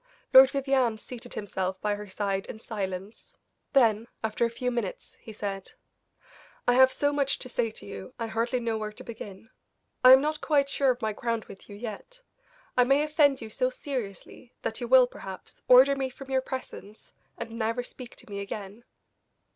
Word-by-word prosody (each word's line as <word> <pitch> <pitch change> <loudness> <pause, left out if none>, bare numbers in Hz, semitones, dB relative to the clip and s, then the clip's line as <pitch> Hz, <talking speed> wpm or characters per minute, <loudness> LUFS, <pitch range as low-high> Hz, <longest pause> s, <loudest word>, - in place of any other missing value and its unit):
Lord 265 0 +10
Vivianne 270 -5 +1
seated 245 +2 -9
himself 190 -2 -3
by 210 +1 0
her 205 0 -6
side 195 0 -2
in - - -7
silence, 200 -2 -6 0.4
then, 230 -4 +4 0.2
after 220 +2 +1
a - - 0
few 250 +2 -2
minutes, 235 -6 -4
he 225 - -10
said: 200 -2 -5 0.9
"I 245 - +5
have 260 +1 +6
so 285 +2 +1
much 280 -1 +1
to - - -7
say 240 -2 -1
to 220 - -13
you 200 +2 -8
I 230 - -3
hardly 230 +3 -1
know 230 -2 -2
where 215 0 -4
to 210 - -12
begin. 220 -2 -10 0.5
I 255 0 +11
am 265 - +9
not 300 +2 -2
quite 280 -3 +2
sure 275 -1 +2
of 250 -1 0
my 215 -1 0
ground 230 +1 -2
with 195 - -13
you 205 - -9
yet; 235 - -8 0.5
I 250 - +6
may 275 +4 +3
offend 295 -3 +3
you 220 -1 -8
so - - +1
seriously 255 - -7
that - - -3
you 240 - -3
will, 255 +1 +7
perhaps, 190 -6 -9
order 260 +2 +7
me 265 -1 -2
from 270 +1 -11
your 260 0 +2
presence, 255 -5 -8 0.3
and 230 -1 -6
never 230 +1 -2
speak 245 0 -11
to - - -15
me 200 -2 -6
again." 200 +2 -7
235 Hz, 190 wpm, -28 LUFS, 210-260 Hz, 0.9 s, I